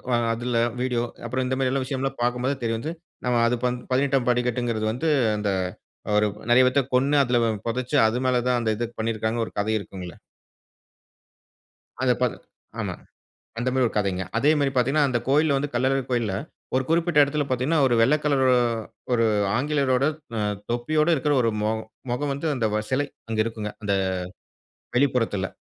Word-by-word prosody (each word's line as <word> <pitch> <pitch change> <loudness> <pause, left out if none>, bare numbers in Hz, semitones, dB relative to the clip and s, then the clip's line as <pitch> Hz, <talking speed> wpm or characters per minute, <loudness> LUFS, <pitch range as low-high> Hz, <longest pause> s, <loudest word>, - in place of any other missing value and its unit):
அ - - +3 0.2
அதுல 120 0 -1 0.2
வீடியோ, 125 -2 0 0.2
அப்புறம் 130 +2 -1
இந்த 130 +1 -1
மாரி 130 -1 +1
எல்லாம் 135 0 0
விஷயம்லாம் 135 0 -3
பார்க்கும் 125 0 0
போதான் 135 -1 -1
தெரிய 115 -1 0
வந்தது. 155 +8 -5 0.3
நம்ம 120 -1 +2
அது 125 - +1 0.4
18ஆம் 135 -1 +2
படி 125 0 +3
கட்டுங்கிறது 115 -3 -1
வந்து 140 +7 -1 0.3
அந்த, 105 -1 -1 0.7
"ஒரு 105 - +3 0.2
நறைய 130 +1 +7
பேர்த்தக் 135 0 +1
கொன்னு, 140 +3 +3
அதுல 120 -1 +2 0.3
பொதச்சு, 125 +1 -1
அது 115 +3 -1
மேலதான் 125 -1 +2
அந்த 110 - +1
இதப் 120 +1 -5
பண்ணிருக்காங்க" 110 0 -1
ஒரு - - -10
கதை 110 +2 0
இருக்குங்கல. 90 -3 -8 1.9
அந்த 130 -1 +3
பத 125 -2 +2 0.5
ஆமா. - - -3 0.7
அந்த 120 +2 0
மாரி 130 -1 +2
ஒரு - - -4
கதைங்க. 95 -3 0
அதே 140 +6 +4
மாரி 140 -2 +1
பாத்தீங்கன்னா, 140 +4 +3
அந்த 125 -2 +1
கோயில்ல 145 0 +3
வந்து 145 +1 -2
கள்ளழகர் 130 +2 +1
கோயில்ல 115 -5 0 0.4
ஒரு 130 0 +2
குறிப்பிட்ட 165 -1 +2
எடத்துல 145 +1 +1
பாத்தீங்கன்னா, 130 +6 +1
ஒரு 120 - +2
வெள்ள 130 +6 +5
கலரு 135 -3 +3 0.6
ஒரு 115 -1 +3 0.3
ஆங்கிலேயரோட 140 -1 +1 0.3
அ - - 0 0.3
தொப்பியோட 150 +7 +1
இருக்ற 145 +2 0
ஒரு 115 - +2
மொ 105 - +1 0.4
மொகம் 140 +3 -1
வந்து 140 +4 -4
அந்த 115 -4 0 0.2
செலை 140 +2 +1 0.2
அங்க 110 - -3
இருக்குங்க, 110 -2 -4
அந்த 100 -1 0 1.0
வெளிப்புறத்துல. 125 -7 +1
125 Hz, 165 wpm, -24 LUFS, 115-135 Hz, 1.9 s, நறைய